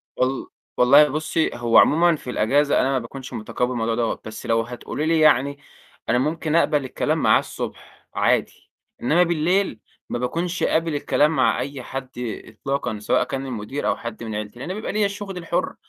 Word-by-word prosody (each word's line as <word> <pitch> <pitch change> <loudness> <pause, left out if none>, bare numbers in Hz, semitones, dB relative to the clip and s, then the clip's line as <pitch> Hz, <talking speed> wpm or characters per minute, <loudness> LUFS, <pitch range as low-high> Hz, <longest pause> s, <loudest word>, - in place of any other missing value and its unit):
وال 130 +1 -1 0.3
والله 140 +4 +7
بُصّي، 155 +2 0
هو 120 -1 +2
عمومًا 170 +2 +5
في 135 - -9
الإجازة 140 +5 +2
أنا 135 - +1
ما 130 - +1
باكونش 130 +3 -9
متقبّل 125 +3 -2
الموضوع 115 -2 -1
دوّة، 115 -1 -1
بس 110 0 -8
لو 115 0 +2
هتقولي 125 +5 -5
لي 165 0 +2
يعني 140 -2 +4 0.5
أنا 120 - +3
ممكن 155 +4 -1
أقبل 150 -4 +2
الكلام - - -1
معاه - - +4
الصبح - - -8
عادي، - - 0 0.3
إنّما 165 +8 +4
بالليل 175 - +1 0.3
ما 120 - -2
باكونش 170 +8 -2
قابل 165 -1 +1
الكلام 150 +1 +2
مع 130 -7 +2
أي 140 -2 -5
حد 135 0 -6 0.4
إطلاقًا، 125 -1 -3
سواء 105 - +2
كان 135 0 -4
المدير 130 +2 -4
أو - - +2
حد 115 0 -7
من 110 -2 -5
عيلتي، 105 +2 -6
لإن 135 - -6
أنا - - -2
بيبقى 215 +3 -4
ليّا 210 0 +1
الشُغل 200 -1 -5
الحُر، 170 -2 -2
135 Hz, 180 wpm, -23 LUFS, 120-160 Hz, 0.5 s, والله